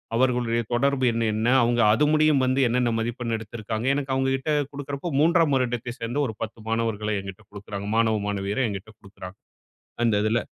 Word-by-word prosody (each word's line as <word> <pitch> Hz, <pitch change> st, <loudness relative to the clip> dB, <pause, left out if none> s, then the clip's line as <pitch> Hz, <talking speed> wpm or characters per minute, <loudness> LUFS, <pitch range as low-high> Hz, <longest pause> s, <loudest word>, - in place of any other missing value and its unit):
அவர்களுடைய 120 Hz, -2 st, +1 dB
தொடர்பு 135 Hz, +1 st, +1 dB
எண் 115 Hz, 0 st, -1 dB
என்ன? 110 Hz, +2 st, -1 dB, 0.2 s
அவுங்க 120 Hz, 0 st, +2 dB
அது 150 Hz, +7 st, +3 dB
முடியும் 155 Hz, -3 st, +4 dB
வந்து 130 Hz, +1 st, +1 dB
என்னென்ன 125 Hz, 0 st, +1 dB
மதிப்பெண் 115 Hz, 0 st, -2 dB
எடுத்திருக்காங்க? 110 Hz, +2 st, -5 dB
எனக்கு 135 Hz, -2 st, -2 dB
அவுங்க 135 Hz, 0 st, +1 dB
கிட்ட 145 Hz, +4 st, -3 dB, 0.2 s
குடுக்கிறப்ப 140 Hz, +3 st, -5 dB
3ஆம் 165 Hz, -3 st, +4 dB
வருடத்தை 120 Hz, -1 st, -2 dB
சேர்ந்த 120 Hz, +5 st, -3 dB
ஒரு 110 Hz, -, -6 dB
10 110 Hz, +1 st, -7 dB
மாணவர்களை 110 Hz, -2 st, -1 dB
என்கிட்ட 95 Hz, -1 st, -9 dB
குடுக்கிறாங்க. 100 Hz, 0 st, -7 dB
மாணவ 110 Hz, -2 st, +2 dB
மாணவியரை 100 Hz, +5 st, -1 dB
என்கிட்ட 100 Hz, +2 st, -7 dB
குடுக்கிறாங்க 95 Hz, -1 st, -11 dB, 0.7 s
அந்த 105 Hz, -3 st, +2 dB
இதில. 115 Hz, +2 st, +2 dB
115 Hz, 165 wpm, -25 LUFS, 110-130 Hz, 0.7 s, முடியும்